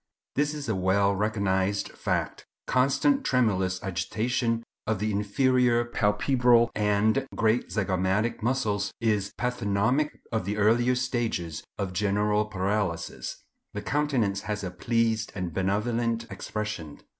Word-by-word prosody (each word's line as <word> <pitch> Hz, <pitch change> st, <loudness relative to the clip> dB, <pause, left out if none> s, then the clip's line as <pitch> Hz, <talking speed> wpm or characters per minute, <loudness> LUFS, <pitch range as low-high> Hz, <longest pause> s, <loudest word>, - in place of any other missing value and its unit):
This 150 Hz, +2 st, 0 dB
is 145 Hz, -3 st, -5 dB
a 110 Hz, -, +1 dB
well 95 Hz, +2 st, +2 dB
recognized 100 Hz, -1 st, 0 dB
fact. -, -, -2 dB, 0.2 s
Constant 140 Hz, -, +2 dB
tremulous 95 Hz, -, +1 dB
agitation 115 Hz, +5 st, -1 dB, 0.2 s
of 110 Hz, -1 st, +1 dB
the 105 Hz, +2 st, -1 dB
inferior 120 Hz, +4 st, +2 dB
palpebral 120 Hz, +2 st, +3 dB
and 110 Hz, +5 st, +2 dB
great 115 Hz, +2 st, +1 dB
zygomatic 100 Hz, +3 st, 0 dB
muscles 110 Hz, -5 st, 0 dB
is 105 Hz, -4 st, 0 dB
pathognomic 125 Hz, +4 st, +1 dB, 0.2 s
of 110 Hz, -3 st, 0 dB
the 105 Hz, +2 st, -2 dB
earlier 120 Hz, +4 st, +3 dB
stages 115 Hz, -10 st, -2 dB
of 95 Hz, -3 st, -3 dB
general 105 Hz, +2 st, +1 dB
paralysis. 95 Hz, -3 st, -2 dB, 0.3 s
The -, -, -4 dB
countenance 130 Hz, -10 st, 0 dB
has 105 Hz, -1 st, -2 dB
a 90 Hz, -, -3 dB
pleased 110 Hz, +3 st, 0 dB
and 90 Hz, -4 st, -3 dB
benevolent 115 Hz, +5 st, 0 dB
expression. 105 Hz, -8 st, -5 dB
105 Hz, 120 wpm, -27 LUFS, 100-120 Hz, 0.3 s, palpebral